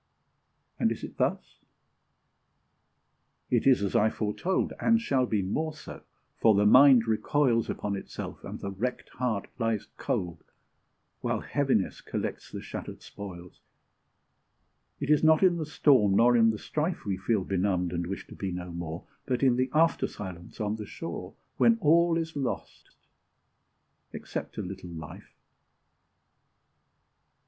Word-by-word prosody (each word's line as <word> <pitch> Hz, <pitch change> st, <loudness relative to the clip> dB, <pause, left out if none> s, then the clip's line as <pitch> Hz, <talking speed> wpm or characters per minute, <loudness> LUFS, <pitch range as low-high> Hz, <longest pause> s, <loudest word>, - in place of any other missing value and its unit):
And -, -, +2 dB
is -, -, -5 dB
it -, -, -8 dB
thus? -, -, -1 dB, 1.9 s
it 120 Hz, +1 st, +2 dB
is 130 Hz, -6 st, +5 dB
as 100 Hz, -, -2 dB
I 110 Hz, -, +4 dB
foretold, 110 Hz, -, -1 dB
And 230 Hz, 0 st, +4 dB
shall 135 Hz, -, +1 dB
be 105 Hz, -4 st, 0 dB
more 155 Hz, +11 st, -2 dB
so; 155 Hz, -, -10 dB, 0.4 s
for 110 Hz, -2 st, +5 dB
the 100 Hz, +1 st, +3 dB
mind 130 Hz, +1 st, +7 dB
recoils 115 Hz, +1 st, +1 dB
Upon 100 Hz, -1 st, -2 dB
itself, 95 Hz, -, -7 dB
and -, -, -7 dB
the 100 Hz, -, -5 dB
wrecked 125 Hz, +6 st, -4 dB
heart 115 Hz, -5 st, -2 dB
lies 115 Hz, -3 st, 0 dB
cold, 85 Hz, -2 st, -3 dB, 0.8 s
While -, -, -1 dB
Heaviness 135 Hz, -9 st, 0 dB
collects -, -, -5 dB
the -, -, -6 dB
shattered -, -, -7 dB
spoils. 90 Hz, -3 st, -10 dB, 1.4 s
It 150 Hz, -, -1 dB
is 150 Hz, -, +4 dB
not 160 Hz, +2 st, +5 dB
in 180 Hz, -2 st, +5 dB
the 155 Hz, -3 st, -3 dB
storm 130 Hz, -10 st, +4 dB
nor 120 Hz, +3 st, +5 dB
in 115 Hz, -1 st, +5 dB
the 110 Hz, -, -1 dB
strife 155 Hz, -, -3 dB
We 100 Hz, -2 st, -1 dB
feel 100 Hz, +1 st, 0 dB
benumbed, 90 Hz, -2 st, 0 dB
and 85 Hz, 0 st, -2 dB
wish 95 Hz, -, -5 dB
to -, -, -12 dB
be 95 Hz, -2 st, -4 dB
no 90 Hz, 0 st, -5 dB
more, 85 Hz, -1 st, -6 dB, 0.2 s
But 125 Hz, 0 st, 0 dB
in 130 Hz, -2 st, +5 dB
the 130 Hz, +1 st, 0 dB
after 165 Hz, +2 st, +3 dB
silence 90 Hz, -4 st, -9 dB
on 105 Hz, 0 st, -1 dB
the 105 Hz, -2 st, -7 dB
shore, -, -, -7 dB, 0.2 s
When 230 Hz, -1 st, +5 dB
all 170 Hz, 0 st, +4 dB
is 165 Hz, -1 st, -3 dB
lost, 135 Hz, -3 st, -4 dB, 1.2 s
except -, -, -6 dB
a -, -, -2 dB
little 90 Hz, -1 st, -7 dB
life. 80 Hz, -3 st, -10 dB
115 Hz, 145 wpm, -28 LUFS, 95-145 Hz, 1.9 s, mind